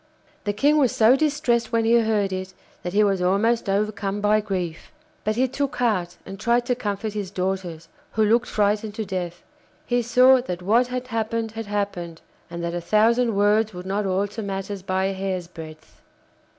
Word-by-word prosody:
The 205 - +1
King 290 +8 +3
was 260 -5 +3
so 225 +3 +5
distressed 275 -6 +1
when 230 -1 +1
he 235 +1 +5
heard 210 -4 +1
it 185 0 -5 0.3
that 180 - -5
he 210 +1 +4
was 195 -3 +1
almost 200 +5 +1
overcome 205 0 -1
by 210 +1 +3
grief. 180 -5 -4 0.3
But 215 +1 0
he 255 +3 +2
took 275 +2 -2
heart 185 -8 0
and 195 0 -8
tried 235 +2 +2
to 250 - +1
comfort 210 -2 -3
his 205 -3 -4
daughters, 185 -4 -3 0.3
who 220 - +2
looked 235 +3 +3
frightened 210 0 0
to 220 - -3
death. 180 -2 -5 0.4
He 245 0 +1
saw 250 +2 +5
that 180 -7 -5
what 230 +6 +3
had 250 0 -5
happened 225 0 -2
had 225 -1 -6
happened, 195 -5 -3 0.3
and 170 0 -6
that 170 0 -2
a 175 - -3
thousand 225 +4 +3
words 210 +1 +2
would 180 +1 -7
not 200 +1 -1
alter 200 +4 -1
matters 195 -1 -4
by 190 0 -1
a 195 - 0
hair's 190 -2 -3
breadth. 155 -2 -12
205 Hz, 190 wpm, -23 LUFS, 190-230 Hz, 0.4 s, so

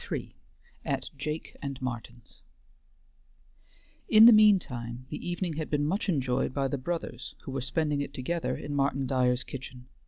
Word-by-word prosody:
III - - -3 0.5
AT - - -2
JAKE 150 +3 -5
AND 140 -2 -5
MARTIN'S 120 -2 -7 1.7
In 220 +1 +9
the 240 - +11
mean 215 -2 +7
time, 120 -6 -7
the - - -5
evening 175 -3 -2
had 155 - -3
been 145 -1 +1
much 195 +7 -1
enjoyed 130 -5 0
by 135 -1 +1
the 135 +1 -3
brothers 135 -4 -4
who - - -6
were 135 0 -2
spending 145 +3 0
it 140 - -4
together 160 +5 -2
in 145 - -6
Martin 140 -1 +1
Dyer's 125 -1 +1
kitchen. 125 -1 -9
140 Hz, 160 wpm, -29 LUFS, 125-160 Hz, 1.7 s, the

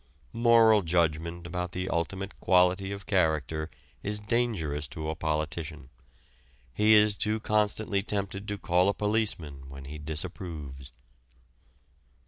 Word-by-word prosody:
Moral 115 -2 +5
judgment 85 0 0
about 90 0 -4
the 90 0 -3
ultimate 95 +4 -3
quality 95 +1 +3
of 100 0 -6
character 80 -4 0 0.3
is 105 +1 -1
dangerous 105 -10 -1
to 80 +1 -4
a - - -5
politician. 75 -2 -3 0.8
He 110 - +5
is 105 0 +5
too 105 +2 -1
constantly 105 -1 +1
tempted 100 0 -3
to 105 - -3
call 90 0 +2
a 100 - 0
policeman 90 -11 -2
when 70 0 -9
he 75 +2 -8
disapproves. 75 -4 -6
90 Hz, 120 wpm, -28 LUFS, 80-105 Hz, 0.8 s, Moral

